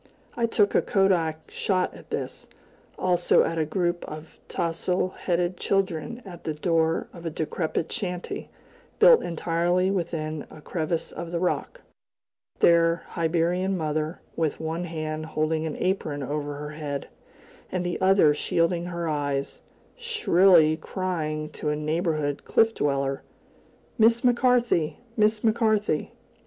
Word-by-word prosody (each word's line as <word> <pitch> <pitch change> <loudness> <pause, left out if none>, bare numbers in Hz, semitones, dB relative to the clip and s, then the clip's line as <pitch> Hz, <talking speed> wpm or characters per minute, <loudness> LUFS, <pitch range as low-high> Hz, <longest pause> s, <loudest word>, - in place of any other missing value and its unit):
I 235 -1 +1
took 205 -3 +2
a - - +4
kodak 170 -5 +1
shot 185 -2 0
at - - -14
this, - - -5 0.5
also 175 -1 +3
at 165 0 -1
a 155 - +1
group 175 +2 -1
of 155 +1 -10
tousle 175 +2 -1
headed 175 0 -1
children 195 +4 -1
at 175 -3 -10
the 155 - -3
door 165 +1 +1
of 170 - -11
a 165 - -2
decrepit 160 +1 -2
shanty 180 -6 -4 0.5
built 485 +1 +7
entirely 175 +2 0
within 160 -5 -3
a - - -12
crevice 160 +1 -2
of 170 - -6
the 175 - -1
rock 185 - -2 0.8
their 170 0 +4
Hibernian 175 +3 0
mother, 155 0 -2
with 160 -3 -1
one 160 +2 -3
hand 155 -2 -4
holding 155 0 -1
an 155 - -4
apron 160 -6 -1
over 145 +1 -3
her 150 +1 -6
head, 150 -2 -5 0.6
and 180 -1 -1
the 175 +1 -3
other 190 -5 +5
shielding 170 +3 0
her 170 -1 -3
eyes, 145 -2 -2 0.3
shrilly 190 - +4
crying 155 -4 -3
to 150 - -3
a 150 - +1
neighboring 155 -1 -1
cliff 225 0 +2
dweller: 140 -3 -1 0.8
"Miss 230 +1 +5
McCarthy! 240 - +2 0.2
Miss 215 0 +2
McCarthy! 215 -7 +1
170 Hz, 135 wpm, -26 LUFS, 155-185 Hz, 0.8 s, built